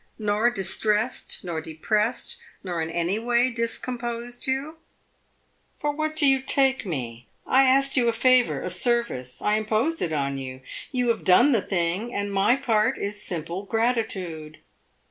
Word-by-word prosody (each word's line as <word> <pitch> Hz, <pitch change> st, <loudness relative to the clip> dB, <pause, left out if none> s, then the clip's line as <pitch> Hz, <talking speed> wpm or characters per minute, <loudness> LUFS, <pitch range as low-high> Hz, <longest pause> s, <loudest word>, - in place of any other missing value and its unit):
"Nor 215 Hz, +2 st, +1 dB
distressed, 210 Hz, +3 st, 0 dB
nor 170 Hz, -3 st, -4 dB
depressed, 210 Hz, -, -1 dB, 0.2 s
nor 175 Hz, -3 st, -3 dB
in 160 Hz, -, -3 dB
any 175 Hz, +5 st, -1 dB
way 240 Hz, +2 st, +2 dB
discomposed 235 Hz, +1 st, -4 dB
you?" 275 Hz, +5 st, -2 dB, 1.0 s
"For 295 Hz, -, -1 dB
what 310 Hz, +1 st, -3 dB
do 310 Hz, -2 st, +2 dB
you 270 Hz, -1 st, +4 dB
take 265 Hz, -3 st, +1 dB
me? 120 Hz, -7 st, -5 dB, 0.2 s
I 270 Hz, +1 st, +5 dB
asked 270 Hz, +1 st, +4 dB
you 240 Hz, -3 st, +3 dB
a -, -, +3 dB
favor 250 Hz, +1 st, +3 dB
a 180 Hz, -, -2 dB
service; 180 Hz, -, 0 dB
I 210 Hz, +1 st, +2 dB
imposed 225 Hz, +10 st, 0 dB
it 165 Hz, -, -1 dB
on 140 Hz, -2 st, -1 dB
you. 130 Hz, -1 st, -7 dB, 0.3 s
You 250 Hz, -3 st, 0 dB
have 230 Hz, -, 0 dB
done 240 Hz, +10 st, +5 dB
the 230 Hz, -6 st, +3 dB
thing, 190 Hz, +6 st, -2 dB
and 205 Hz, 0 st, -2 dB
my 200 Hz, +5 st, +3 dB
part 235 Hz, -2 st, +1 dB
is 205 Hz, +1 st, -4 dB
simple 170 Hz, 0 st, -4 dB
gratitude." 200 Hz, -8 st, -2 dB
220 Hz, 155 wpm, -25 LUFS, 180-250 Hz, 1.0 s, I